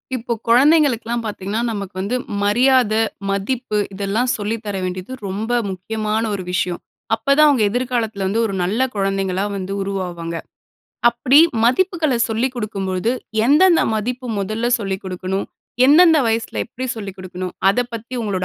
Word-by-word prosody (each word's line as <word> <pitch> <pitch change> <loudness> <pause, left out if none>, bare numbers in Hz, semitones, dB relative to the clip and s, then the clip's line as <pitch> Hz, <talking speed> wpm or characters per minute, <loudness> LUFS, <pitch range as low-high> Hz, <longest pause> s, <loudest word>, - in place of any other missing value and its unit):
இப்போ 235 0 -2
குழந்தைகளுக்கெல்லாம் 245 -3 +3
பாத்தீங்கன்னா, 210 +1 -3
நமக்கு 200 -3 -6
வந்து 205 +6 -2 0.3
மரியாத, 245 +2 +3 0.4
மதிப்பு 210 +3 -1 0.2
இதெல்லாம் 205 +6 -1
சொல்லி 210 +1 -2
தர 205 -1 -3
வேண்டியது 185 +6 -4
ரொம்ப 210 +5 -3 0.2
முக்கியமான 215 +3 -2
ஒரு 195 -2 -3
விஷயம். 180 0 -1 0.4
அப்ப 225 - -25
தான் 305 0 +7
அவங்க 255 -7 +3
எதிர்காலத்துல 235 -5 -1
வந்து 220 +4 0
ஒரு 205 - -3
நல்ல 200 +6 -1 0.2
குழந்தைகளா 195 -1 -1
வந்து 190 0 -4
உருவாவாங்க. 180 -4 -4 0.7
அப்படி 245 +4 +4 0.3
மதிப்புகள்ல 315 +1 +2
சொல்லி 225 +3 0
குடுக்கும்பொழுது 200 -3 -2 0.4
எந்தெந்த 330 +6 +5
மதிப்பு 250 +4 -3
மொதல 215 +4 -1
சொல்லி 195 -3 -2
குடுக்கணும்? 185 +1 -3 0.4
எந்தெந்த 320 +3 +7
வயசுல 225 0 -1
எப்படி 255 +1 -7
சொல்லிக் 200 -3 -7
குடுக்கணும்? 185 -1 -6 0.2
அத 200 - -2 0.2
பத்தி 230 +3 -7
உங்களோட 195 -4 -2
215 Hz, 135 wpm, -20 LUFS, 195-245 Hz, 0.7 s, தான்